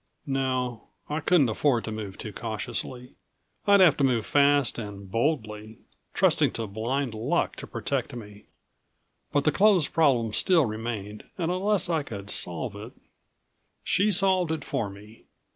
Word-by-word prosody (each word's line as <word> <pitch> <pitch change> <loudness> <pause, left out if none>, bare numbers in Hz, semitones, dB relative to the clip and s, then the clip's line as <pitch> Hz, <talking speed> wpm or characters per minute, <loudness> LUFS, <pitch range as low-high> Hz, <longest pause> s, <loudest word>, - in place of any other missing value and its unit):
No 130 -3 -2 0.2
I 150 +1 -1
couldn't 160 -3 +4
afford 120 +1 +1
to 110 - -5
move 105 -3 -6
too 105 - -7
cautiously. 120 +3 -5 0.6
I'd 200 -1 +6
have 170 -6 +7
to 140 - +1
move 120 -5 +2
fast 145 -3 +3
and 100 -3 -8
boldly, 110 -4 -2 0.4
trusting - - +3
to 115 - -3
blind 115 +5 -2
ruck 110 - 0
to - - -7
protect - - -3
me. 105 -3 -10 0.9
But 145 -1 +2
the 155 - +3
clothes 195 -3 +4
problem 125 -9 +2
still 170 - +3
remained, 110 -2 -5
and 170 -1 -1
unless 195 +2 +1
I 165 -3 +1
could 100 -7 -7
solve 85 -2 -3
it - - -9 0.9
She 210 +3 +2
solved 185 -3 +2
it 160 - -3
for 115 -7 -2
me. 105 +3 -14
125 Hz, 150 wpm, -27 LUFS, 110-155 Hz, 0.9 s, have